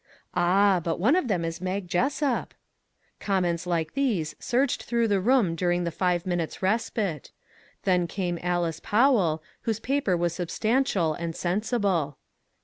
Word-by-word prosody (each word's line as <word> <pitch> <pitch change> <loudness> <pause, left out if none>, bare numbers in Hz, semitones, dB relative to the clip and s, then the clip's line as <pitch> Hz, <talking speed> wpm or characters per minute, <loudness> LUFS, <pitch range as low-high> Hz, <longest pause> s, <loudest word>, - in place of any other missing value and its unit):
" - - -46
Ah, 185 +1 +3
but 165 0 -2
one 240 - +4
of 365 -8 +1
them 180 -6 0
is 165 +1 -4
Mag 185 0 -3
Jessup! 265 - 0 0.3
" - - -43
Comments 180 -3 0
like 165 -3 -1
these 215 - 0
surged 250 +2 0
through 235 -1 0
the 200 -2 +2
room 230 -5 +3
during 175 +1 0
the 170 - -2
five 175 0 0
minutes' 175 -1 -3
respite; 200 - -1 0.5
then 180 -2 +2
came 175 -1 -3
Alice 175 -2 -1
Powell, 205 - +2 0.2
whose 225 -1 -2
paper 255 -7 0
was 170 0 0
substan 220 +9 0
tial 165 - 0
and 165 -1 -4
sensible. 190 - 0
185 Hz, 155 wpm, -26 LUFS, 170-225 Hz, 0.5 s, one